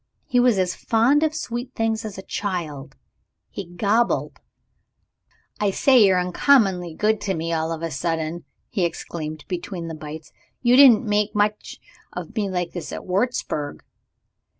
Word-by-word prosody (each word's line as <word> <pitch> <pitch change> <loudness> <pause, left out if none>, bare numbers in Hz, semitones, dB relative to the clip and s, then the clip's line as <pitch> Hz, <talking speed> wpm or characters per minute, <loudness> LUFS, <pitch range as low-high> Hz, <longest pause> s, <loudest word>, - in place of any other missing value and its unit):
He 250 - +1
was 245 -4 +4
as 185 -1 +1
fond 240 +6 +2
of 315 -1 +1
sweet 245 -3 -5
things 225 0 -1
as 210 -3 -6
a 190 - -7
child 155 -10 -4 0.6
he 195 - -6
gobbled. 210 +7 0 1.2
"I 210 - +2
say, 250 +4 +5
you're 190 -2 +4
uncommonly 180 - +2
good 215 +2 +1
to 195 -2 -1
me 165 +1 -2
all 160 0 -1
of 165 0 -5
a 165 - -2
sudden," 160 +3 -3 0.3
he 190 - 0
exclaimed 155 -2 -4
between 175 -1 -5
the - - -5
bites. 155 0 -9 0.3
"You 240 0 +5
didn't 260 -3 +7
make 210 0 0
much 210 0 -1 0.3
of - - -7
me 205 -3 -1
like 180 -2 -2
this 165 -5 -6
at - - -7
Wurzburg!" 185 - -2
190 Hz, 155 wpm, -23 LUFS, 165-225 Hz, 1.2 s, didn't